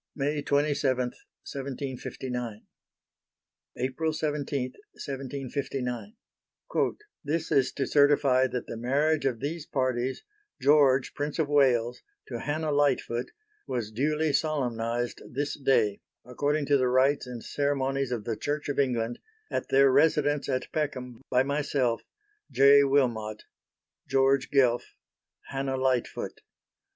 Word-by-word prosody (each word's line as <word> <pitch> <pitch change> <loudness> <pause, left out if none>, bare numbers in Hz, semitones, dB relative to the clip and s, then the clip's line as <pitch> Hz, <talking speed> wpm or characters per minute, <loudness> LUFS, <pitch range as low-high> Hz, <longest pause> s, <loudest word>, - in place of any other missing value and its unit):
May 145 +1 -1
27, 145 -2 +1 0.5
1759. 130 -4 -5 1.1
April 135 +6 -1
17, 145 -4 -2 0.2
1759 135 - -4 1.1
"This 160 +2 -2
is 135 - +3
to 135 - -1
Certify 140 -3 +4
that 125 -1 -4
the - - -6
marriage 145 +6 +1
of 120 -4 -2
these 155 +2 -4
parties 130 -1 -1 0.4
(George, 140 -3 +4
Prince 145 0 -3
of 155 -3 0
Wales, 125 -5 +3 0.3
to - - -4
Hannah 155 +1 -2
Lightfoot) 135 -4 +1 0.4
was 120 -4 -3
duly 150 +6 0
solemnized 120 -6 -1
this 145 +3 -2
day, 115 -8 +2 0.2
according 145 +4 -1
to 140 0 +4
the 130 -1 +2
rites 130 +2 +3
and 120 -2 -7
ceremonies 135 -2 -1
of 120 -4 -2
the 115 0 -2
Church 145 +5 -3
of 145 - -1
England, 120 -4 0 0.3
at - - -2
their 135 0 +5
residence 145 0 +3
at 130 -1 -2
Peckham, 130 -6 -3
by 125 0 +3
myself. 140 -4 0 0.5
"J. 140 +1 +6
Wilmot." 120 -6 +1 0.6
"George 135 0 +3
Guelph." 125 -4 +2 0.5
"Hannah 135 -1 -2
Lightfoot." 130 -2 -1
135 Hz, 115 wpm, -28 LUFS, 125-145 Hz, 1.1 s, J